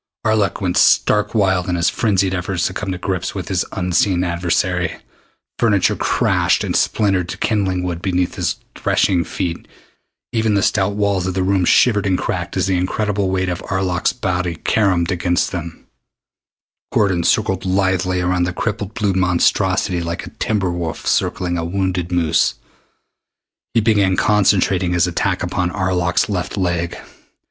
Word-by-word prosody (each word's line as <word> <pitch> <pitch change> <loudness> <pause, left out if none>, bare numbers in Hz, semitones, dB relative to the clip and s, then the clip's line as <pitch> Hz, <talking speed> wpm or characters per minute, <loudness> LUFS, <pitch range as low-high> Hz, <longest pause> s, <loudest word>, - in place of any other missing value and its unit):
Arlok 110 -2 +1
went 90 -2 0
stark 105 +2 +3
wild 95 -4 +1
in 90 - 0
his 85 0 +1
frenzied 95 -4 +1
efforts 90 -1 -2
to 90 - -1
come 95 0 -4
to 90 - -3
grips 95 0 -3
with 95 -1 -5
his 95 -3 +1
unseen 90 0 +1
adversary. 90 0 -1 0.6
Furniture 110 -5 +2
crashed - - +1
and - - -2
splintered 95 -4 +1
to - - -5
kindling 95 -4 0
wood 85 -2 -3
beneath 90 -2 0
his - - -1 0.2
threshing 90 -3 +1
feet. 85 0 -4 0.7
Even 110 -2 +1
the 100 - +2
stout 100 -2 +1
walls 100 -3 0
of 95 - -3
the 95 - 0
room 95 0 +1
shivered 105 +1 +3
and 95 -2 +2
cracked - - -3
as - - +1
the 95 -1 +1
incredible 100 +2 -1
weight 95 0 0
of 90 0 -3
Arlok's 95 -2 0
body 90 -6 -2
caromed 95 -2 +1
against 90 0 0
them. 85 -2 -6 1.1
Gordon 95 -5 +1
circled 95 +1 +1
lithely 95 -1 0
around 90 0 +1
the 90 - -3
crippled 105 0 -3
blue 100 -3 0
monstrosity 90 0 +1
like 85 0 -4
a - - -10
timber 100 -5 0
wolf 85 -2 -4
circling 85 -1 0
a - - -2
wounded 90 0 -2
moose. 85 -3 +2 1.2
He 115 - +4
began 100 -4 +2
concentrating 95 -3 +2
his 85 -1 +3
attack 90 +1 -1
upon 90 0 -1
Arlok's 90 -1 0
left 100 0 -3
leg. 85 -2 -1
95 Hz, 155 wpm, -19 LUFS, 90-100 Hz, 1.2 s, He